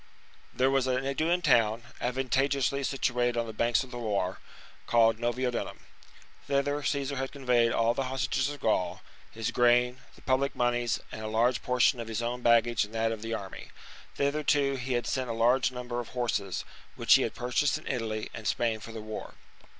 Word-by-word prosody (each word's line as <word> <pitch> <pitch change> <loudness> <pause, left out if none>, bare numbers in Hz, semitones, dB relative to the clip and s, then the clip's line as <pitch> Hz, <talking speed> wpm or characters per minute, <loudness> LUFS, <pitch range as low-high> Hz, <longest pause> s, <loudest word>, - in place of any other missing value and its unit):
There 130 +1 +2
was 135 -1 +2
an 130 +1 0
Aeduan 160 +6 0
town, 115 -6 +3 0.2
advantageously 135 +2 0
situated 120 -3 0
on 115 - 0
the 110 - -7
banks 115 +3 +2
of 130 - -13
the 120 - -6
Loire, 100 -5 -1 0.5
called 115 -1 +4
Novio 125 +2 0
[Nevers.] 120 - -2
dunum. - - -11 0.7
Thither 145 +1 0
Caesar 140 -1 -1
had 135 0 -3
conveyed 125 -4 +2
all 115 +1 +2
the 135 +2 -2
hostages 135 +1 -1
of 145 -1 -7
Gaul, 95 -7 0 0.3
his 110 0 -3
grain, 125 +1 +3
the - - -19
public 135 +1 +1
monies, 120 -1 +1
and 110 - -7
a 110 - -4
large 115 +3 +1
portion 125 0 +2
of 115 - -5
his 115 +1 -3
own 120 +1 -3
baggage 115 -1 +4
and 105 +2 -9
that 115 0 +1
of 110 -2 -5
the 115 0 -3
army: 95 -3 -8 0.5
thither, 140 +2 0
too, 140 -2 +2
he 130 0 -3
had 120 0 0
sent 130 -2 -2
a - - -1
large 120 +2 +3
number 125 -1 -4
of 120 - -5
horses, 110 -6 -2 0.3
which - - +4
he - - +6
had - - -2
purchased 125 +4 +1
in 155 - -13
Italy 110 -4 -3
and 115 -2 -6
Spain 115 -2 0
for 110 +2 -9
the 110 -1 -7
war. 110 0 -7
120 Hz, 195 wpm, -29 LUFS, 115-135 Hz, 0.7 s, he